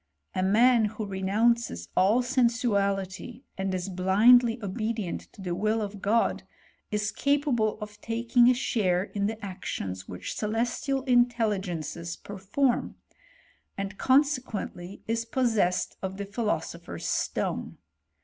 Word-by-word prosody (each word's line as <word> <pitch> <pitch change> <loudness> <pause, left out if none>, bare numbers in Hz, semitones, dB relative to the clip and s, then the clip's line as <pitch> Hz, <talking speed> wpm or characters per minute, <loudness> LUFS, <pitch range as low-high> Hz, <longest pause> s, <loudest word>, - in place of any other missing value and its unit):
A 185 - -1
man 225 +4 +5
who 215 +1 -4
renounces 200 - 0
all 215 +7 +4
sensuality, 235 -3 0
and 190 0 -2
is 185 0 -2
blindly 220 +6 +5
obedient 215 -1 -3
to 195 - -11
the 180 -2 -2
will 215 +5 +1
of 205 -2 -5
God, 225 +3 +2 0.5
is 210 -1 -1
capable 280 -7 +1
of 210 -1 -9
taking 235 +2 +3
a 250 - +4
share 185 -7 +1
in 200 0 -2
the 220 +1 -3
actions 95 - -5
which 90 - -6
celestial 240 +5 -1
intel 240 -4 +3
ligences 170 -1 -5
perform; 205 +7 -1 0.8
and 195 0 -5
consequently 255 -9 0
is 230 +1 0
possessed 225 -7 0
of 190 0 -4
the 200 - -4
philosopher's 210 +2 -3
stone. - - -2
210 Hz, 120 wpm, -27 LUFS, 190-240 Hz, 0.8 s, man